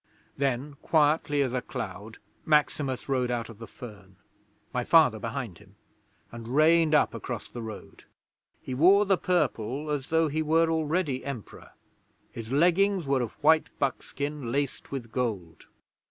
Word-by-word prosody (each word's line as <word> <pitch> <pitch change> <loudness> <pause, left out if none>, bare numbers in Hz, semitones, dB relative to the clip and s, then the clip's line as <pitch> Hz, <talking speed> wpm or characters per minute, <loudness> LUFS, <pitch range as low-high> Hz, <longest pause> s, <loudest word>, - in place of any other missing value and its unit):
'Then, 140 +1 -1
quietly 150 -2 +2
as 130 -2 -3
a 125 - -1
cloud, 105 0 -7 0.3
Maximus 145 -3 +1
rode 130 -3 0
out 120 -2 -2
of 115 -2 -12
the 115 - -8
fern 100 -5 -12 0.6
(my - - -1
Father - - +5
behind - - -5
him), - - -20 0.6
and 115 -1 -9
reined 155 +4 +4
up 150 - +3
across - - -6
the 120 - -6
road. 110 -2 -9 0.6
He 130 - -5
wore 190 +10 +5
the 195 -1 +3
Purple, 150 - -1
as 145 -2 -2
though 160 0 +3
he 155 +2 -1
were 160 +1 +2
already 160 -3 -1
Emperor; 130 -5 -8 0.6
his 115 0 -8
leggings 180 +5 +3
were 135 -1 +1
of 120 - -4
white 160 +1 +4
buckskin 140 -1 -3
laced 140 0 -2
with 125 -5 -6
gold. 105 -11 -4
140 Hz, 150 wpm, -27 LUFS, 120-155 Hz, 0.6 s, Father